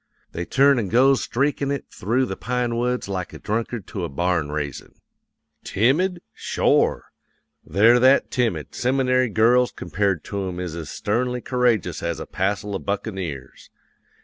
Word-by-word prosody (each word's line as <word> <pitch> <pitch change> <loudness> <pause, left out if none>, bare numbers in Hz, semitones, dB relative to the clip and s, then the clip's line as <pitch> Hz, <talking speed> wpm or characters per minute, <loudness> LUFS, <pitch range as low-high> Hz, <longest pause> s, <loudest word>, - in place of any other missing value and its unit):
They 85 - -4
turns 140 +3 +4
an' 105 - -2
goes 130 +6 +4
streakin' 140 +2 -1
it 140 0 -2
through 120 +7 0
the 95 - -4
pine 125 +1 -2
woods 125 0 -1
like 95 -2 -4
a - - -7
drunkard 110 -1 -3
to 95 - -4
a 85 - -3
barn 85 0 -1
raisin'. 75 -2 -5 0.7
"Timid? 170 - +1
Shore! - - +1 0.5
They're 110 +8 +4
that 130 +2 +4
timid, 125 -4 -1
seminary 130 0 +1
girls 120 +4 +3
compared 95 -5 -1
to 100 -2 -4
'em 90 -1 -5
is 90 -3 -4
as 80 -3 -6
sternly 125 +4 -1
courageous 120 -9 0
as 85 -2 -3
a - - -5
passel 100 +2 -2
of 95 - -4
buccaneers. 95 - -5
110 Hz, 150 wpm, -23 LUFS, 90-125 Hz, 0.7 s, turns